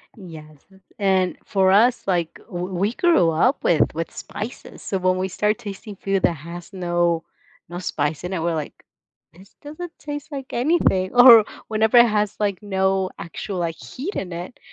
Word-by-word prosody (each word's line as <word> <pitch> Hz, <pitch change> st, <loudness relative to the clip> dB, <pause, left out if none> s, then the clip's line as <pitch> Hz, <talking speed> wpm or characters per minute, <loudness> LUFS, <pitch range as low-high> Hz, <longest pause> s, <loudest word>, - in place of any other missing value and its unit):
Yes, 155 Hz, -6 st, -12 dB, 0.4 s
and 190 Hz, -2 st, +1 dB
for 190 Hz, -1 st, +2 dB
us, 235 Hz, +4 st, +3 dB
like, 175 Hz, -4 st, 0 dB
w 180 Hz, -5 st, -4 dB
we 200 Hz, +5 st, 0 dB
grew 330 Hz, -, +3 dB
up 240 Hz, -, +1 dB
with 165 Hz, -, +2 dB
with 165 Hz, +1 st, -4 dB
spices, 215 Hz, +4 st, -8 dB
so 195 Hz, -, -2 dB
when 185 Hz, 0 st, +1 dB
we 185 Hz, +1 st, -1 dB
start 210 Hz, +3 st, 0 dB
tasting 205 Hz, -1 st, -8 dB
food 195 Hz, 0 st, -1 dB
that -, -, +3 dB
has 170 Hz, +3 st, -10 dB
no 175 Hz, -2 st, 0 dB, 0.5 s
no 175 Hz, 0 st, -6 dB
spice 155 Hz, -4 st, -2 dB
in 180 Hz, +1 st, -4 dB
it, 175 Hz, -, -2 dB
we're 170 Hz, 0 st, 0 dB
like, 155 Hz, -2 st, -6 dB, 0.5 s
"This 190 Hz, +4 st, -18 dB
doesn't 310 Hz, +4 st, -8 dB
taste 290 Hz, +1 st, -7 dB
like 270 Hz, -2 st, -7 dB
anything." 240 Hz, -, +1 dB
Or 245 Hz, -3 st, +9 dB, 0.2 s
whenever 220 Hz, +2 st, +2 dB
it 240 Hz, 0 st, +8 dB
has 210 Hz, -2 st, 0 dB
like 200 Hz, -1 st, -1 dB
no 190 Hz, -1 st, 0 dB
actual, 185 Hz, +3 st, -6 dB
like, 165 Hz, -2 st, -2 dB
heat 310 Hz, -, -7 dB
in 185 Hz, -, -4 dB
it 175 Hz, +7 st, -8 dB
190 Hz, 175 wpm, -22 LUFS, 175-220 Hz, 0.5 s, Or